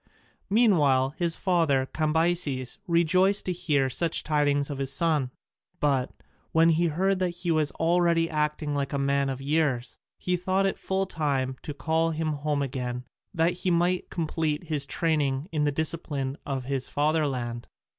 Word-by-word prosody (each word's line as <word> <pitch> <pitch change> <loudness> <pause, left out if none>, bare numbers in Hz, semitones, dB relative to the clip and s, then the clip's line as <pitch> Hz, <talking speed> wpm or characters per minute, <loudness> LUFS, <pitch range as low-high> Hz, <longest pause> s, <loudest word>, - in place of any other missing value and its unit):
Meanwhile 150 - +3
his 170 -2 +1
father, 165 -8 +2
Cambyses, 155 -3 0
rejoiced 185 +4 +3
to 185 - 0
hear 155 -7 +1
such 165 +6 +1
tidings 145 -1 +1
of 140 - -5
his 135 -1 0
son; 150 -5 +2 0.5
but, 135 -3 +1 0.4
when 165 +1 +5
he 165 +1 +2
heard 185 +4 0
that 185 -1 +1
he 175 - +1
was 155 -2 +2
already 170 0 +2
acting 150 -1 -1
like 140 0 -2
a - - 0
man 140 0 +1
of 135 -1 -4
years, 135 -4 -1 0.2
he 180 - -1
thought 185 +2 0
it 195 - -1
full 190 0 -1
time 140 -7 -1
to 150 - -7
call 160 +2 +1
him 160 0 -2
home 145 0 -1
again 125 -2 -4 0.3
that 170 -2 +1
he 185 - 0
might 175 +1 +1
complete 160 -2 -2
his 150 -4 -1
training 150 -3 0
in 150 -2 0
the 145 - +2
discipline 145 -3 -2
of 135 -2 -2
his 135 -1 -2
fatherland. 140 -6 -1
155 Hz, 160 wpm, -26 LUFS, 140-170 Hz, 0.5 s, when